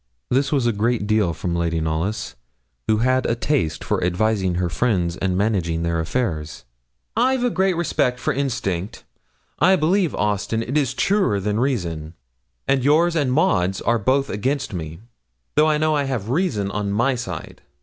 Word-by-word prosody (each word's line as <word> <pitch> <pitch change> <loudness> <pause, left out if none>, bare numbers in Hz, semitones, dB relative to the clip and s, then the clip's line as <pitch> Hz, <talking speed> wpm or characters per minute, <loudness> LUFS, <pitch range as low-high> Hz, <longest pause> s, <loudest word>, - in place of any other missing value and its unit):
This 135 +2 +2
was 135 -5 +1
a 120 - +3
great 110 +1 0
deal 105 -4 +2
from 85 +1 -3
Lady 85 -1 0
Knollys, 80 +7 -2 0.5
who 110 - +3
had 130 0 +2
a 115 - +1
taste 120 - -1
for - - -1
advising 95 0 +1
her 90 0 0
friends 85 -1 0
and 90 0 -1
managing 90 -6 0
their 85 0 0
affairs. 80 - -3 0.5
'I've 255 +2 +2
a 245 - +2
great 190 -1 +1
respect 125 -7 0
for - - 0
instinct. 115 -7 -2 0.6
I 185 +4 +5
believe, 180 +1 +1
Austin, 105 +2 -1
it 125 +5 -4
is 135 -3 +1
truer 195 - +2
than 105 +2 -1
reason, 85 - -2 0.5
and 135 -2 +2
yours 165 +5 +3
and 145 -5 +1
Maud's 95 - +2
are 115 0 +1
both 135 +5 +1
against 130 +5 -2
me, 80 0 -6 0.5
though 155 - +4
I 150 - +2
know 155 0 +2
I 145 -1 +1
have 120 -6 -3
reason 125 - 0
on 105 -1 -2
my 120 +7 +2
side.' 95 -10 -6
110 Hz, 170 wpm, -22 LUFS, 90-140 Hz, 0.6 s, I